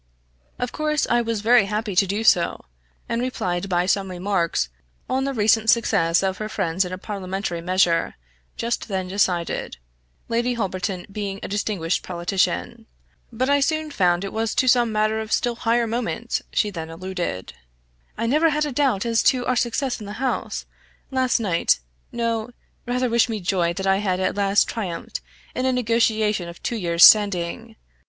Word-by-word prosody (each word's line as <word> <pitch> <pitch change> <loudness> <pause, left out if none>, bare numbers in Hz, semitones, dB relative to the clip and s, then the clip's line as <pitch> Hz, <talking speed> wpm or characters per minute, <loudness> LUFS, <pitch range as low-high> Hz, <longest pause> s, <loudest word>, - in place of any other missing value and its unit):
Of 250 -1 -3
course 305 -1 0
I 240 0 +4
was 230 -2 -2
very 230 -1 +5
happy 210 0 -3
to 195 +2 +4
do 205 +4 -2
so, 175 -6 +3 0.4
and 230 - -1
replied 195 -7 -2
by 175 -1 +1
some 195 0 0
remarks 180 - 0 0.4
on 265 +1 0
the 275 - -2
recent 220 0 +3
success 170 -7 +3
of 190 -1 -1
her 215 0 -4
friends 185 -3 0
in 180 - -6
a 185 - -4
parliamentary 190 -3 -4
measure, 175 -1 +1 0.4
just 235 +1 -2
then 190 -3 -2
decided 180 - -1 0.5
Lady 240 +2 0
Holberton 190 -3 -3
being 200 -1 -4
a - - -3
distinguished 200 -4 -1
politician. 190 +5 -2 0.4
But 250 +3 -1
I 285 0 +3
soon 310 +2 0
found 180 -7 +2
it 195 - -5
was 225 0 -1
to 260 - +2
some 240 -2 +4
matter 215 +1 +1
of 220 0 -6
still 240 -1 +1
higher 235 +1 +1
moment 235 +1 -2
she 210 - +1
then 165 -4 -6
alluded. 175 - -5 0.6
"I 230 - -1
never 305 +7 +3
had 300 0 0
a 295 - -3
doubt 255 -6 +1
as 230 -1 +2
to 250 -2 +3
our 255 - +1
success 245 +2 -1
in 210 - -8
the 205 - -6
house, 255 +3 -3 0.5
last 260 -2 +1
night 180 - +2 0.3
no; 230 -1 -2 0.4
rather 250 +1 0
wish 235 0 +2
me 220 -2 -2
joy 175 -2 0
that 195 +2 -4
I 195 0 +3
have 190 -3 -1
at 185 - 0
last 200 0 +3
triumphed 185 -7 -5 0.3
in 255 +1 -1
a - - +3
negotiation 220 -6 +1
of 170 - -12
two 235 - -2
years 170 -5 +5
standing. 195 -5 +4
210 Hz, 175 wpm, -23 LUFS, 185-235 Hz, 0.6 s, very